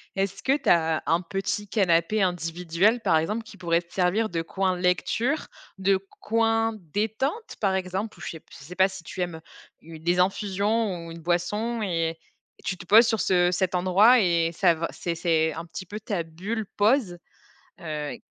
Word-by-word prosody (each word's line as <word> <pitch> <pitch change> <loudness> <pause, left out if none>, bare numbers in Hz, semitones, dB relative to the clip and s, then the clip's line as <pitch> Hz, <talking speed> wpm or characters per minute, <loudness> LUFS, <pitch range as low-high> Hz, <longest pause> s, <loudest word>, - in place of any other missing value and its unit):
Est-ce 195 0 -2
que 270 +2 +2
t'as 165 - +2
un 165 +2 +2
petit 195 +3 -3
canapé 195 0 +2
individuel, 175 +4 +1
par 175 -7 +3
exemple, 210 +9 -1
qui 220 - -14
pourrait 170 -2 +1
te 170 - -23
servir 195 +5 +1
de 165 -1 -2
coin 185 +2 -1
lecture, 205 - 0 0.3
de 195 0 +3 0.2
coin 225 0 +1 0.2
détente, 245 - -2
par 195 -3 +2
exemple? 190 +3 -3
Ou - - -15
je - - -6
sais 160 - -7
p - - -37
je - - -13
sais 180 +4 -10
pas 190 +1 +5
si 190 -2 -10
tu 185 - -6
aimes, 175 -2 -2
heu, 160 - -10 0.4
u 160 0 -11
des 175 +3 0
infusions 200 0 0
ou 165 - -8
une 165 - -9
boisson 210 +8 -1
et 165 -4 -1 0.4
et - - -21
tu 190 - -2
te 175 0 -12
poses 225 +5 +8
sur 220 -1 +1
ce 180 -2 +3
cet 185 0 0
endroit 195 +7 +5
et 170 -4 +2
ça 175 0 +3
va 165 +1 -3
c'est 170 - -3
c'est 160 -2 +1
un 165 - -6
petit 175 +2 -8
peu 205 +4 -7
ta 205 -5 -3
bulle 195 +8 -4
pause. 210 -4 +2 0.6
Heu 150 -3 -4
185 Hz, 195 wpm, -25 LUFS, 170-210 Hz, 0.6 s, poses